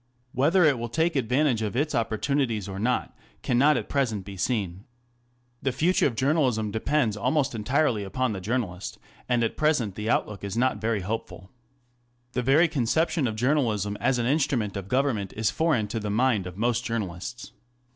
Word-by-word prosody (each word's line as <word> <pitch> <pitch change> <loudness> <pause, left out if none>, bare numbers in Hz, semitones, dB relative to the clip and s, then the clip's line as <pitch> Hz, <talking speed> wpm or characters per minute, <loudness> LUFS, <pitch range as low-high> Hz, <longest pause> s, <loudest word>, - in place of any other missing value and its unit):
Whether 155 +9 +3
it 145 -6 +4
will 120 0 -4
take 160 +7 +1
advantage 130 -1 +1
of 110 0 -2
its 145 +4 0
opportunities 115 -1 0
or 95 0 -6
not 125 +4 -1 0.3
cannot 135 +5 +4
at - - -4
present 115 -9 -1
be 100 -1 -8
seen. 95 -2 -2 0.8
The 135 - 0
future 160 +8 +2
of 120 - -4
journalism 130 -6 +1
depends 110 +1 0
almost 135 +6 0
entirely 120 0 +1
upon 110 +5 -1
the 95 - -5
journalist, 100 -3 -3 0.3
and 120 -1 +2
at 115 - -2
present 150 -10 +1
the 105 +3 -4
outlook 105 -4 0
is 100 +2 -4
not 125 -4 +1
very 110 -2 0
hopeful. 95 -2 -5 0.8
The 125 - 0
very 140 +7 +4
conception 155 +2 +1
of 110 - -3
journalism 110 -5 +1
as 125 +1 +2
an 120 - 0
instrument 130 -6 0
of 100 -1 -5
government 125 -6 0
is 110 -1 +1
foreign 150 -10 +1
to 115 - -2
the 105 -1 -4
mind 110 -3 +1
of 90 +1 -9
most 120 +2 0
journalists. 115 +3 -4
120 Hz, 175 wpm, -26 LUFS, 105-135 Hz, 0.8 s, it